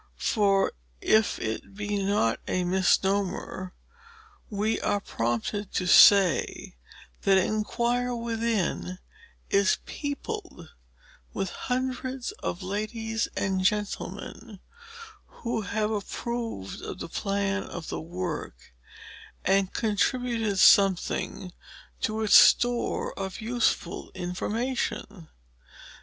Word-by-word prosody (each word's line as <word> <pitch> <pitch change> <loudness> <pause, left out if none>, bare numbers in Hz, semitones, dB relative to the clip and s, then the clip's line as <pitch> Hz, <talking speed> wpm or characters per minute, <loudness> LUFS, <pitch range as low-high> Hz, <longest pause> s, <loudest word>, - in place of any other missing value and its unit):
For, 200 -2 +2 0.3
if 220 - +3
it 110 - -5
be 205 0 -2
not 195 - +1
a 180 - 0
misnomer, 185 0 0 0.7
we 215 +2 0
are 205 0 +1
prompted 120 - -2
to 180 - 0
say 190 - +5 0.5
that 195 -1 +4
"ENQUIRE 235 +5 0
WITHIN" 230 -6 -1 0.5
is 200 -1 +4
peopled 285 - -6 0.7
with 195 - -2
hundreds 255 +2 -3
of 180 +3 -3
ladies 220 +3 -2
and 190 -1 0
gentlemen, 205 0 -3 0.7
who 235 -2 -4
have 215 +1 -1
approved 225 - -4
of - - -6
the - - -6
plan 200 0 -1
of 170 -2 -7
the - - -4
work, 165 - -6 0.7
and 195 0 +2
contributed 225 -1 0
something 190 -1 +3 0.5
to 220 0 -1
its 210 - +2
store 245 -1 +5
of 190 -1 -4
useful 225 -6 -1
information. 205 0 -3
205 Hz, 95 wpm, -27 LUFS, 185-225 Hz, 0.7 s, say